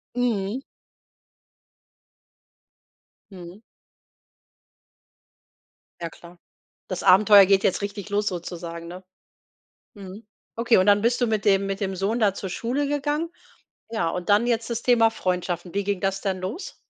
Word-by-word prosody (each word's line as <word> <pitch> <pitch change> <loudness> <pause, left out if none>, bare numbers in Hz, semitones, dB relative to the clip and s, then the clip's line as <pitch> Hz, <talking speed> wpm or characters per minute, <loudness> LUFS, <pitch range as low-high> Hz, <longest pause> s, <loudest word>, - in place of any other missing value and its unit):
Mhm. 235 0 -1 2.7
Mhm. 180 +2 -11 2.4
Ja 170 - -3
klar. 175 +2 -16 0.5
Das 185 - -4
Abenteuer 200 +1 +7
geht 195 0 +3
jetzt 190 - +1
richtig 200 0 -6
los 205 +1 0
sozusagen, 170 -1 -6
ne? 180 +2 -9 0.9
Mhm. 200 +2 -11 0.3
Okay, 230 -1 +3
und 185 - +3
dann 205 0 +4
bist 235 +2 +1
du 240 - +3
mit 215 -2 -1
dem 195 -1 +3
mit 195 0 -3
dem 195 -2 -3
Sohn 200 +6 -1
da 205 -4 +3
zur 195 -1 -6
Schule 255 +9 -2
gegangen. 295 +3 -1 0.6
Ja, 220 -8 -1
und 180 +2 -5
dann 210 +4 +4
jetzt 230 -1 -1
das 235 0 -3
Thema 230 -2 +4
Freundschaften. 180 -3 -3
Wie 200 0 -1
ging 200 -2 -2
das 195 -1 -1
dann 190 -2 -2
los? 200 - -6
200 Hz, 140 wpm, -24 LUFS, 185-225 Hz, 2.7 s, Abenteuer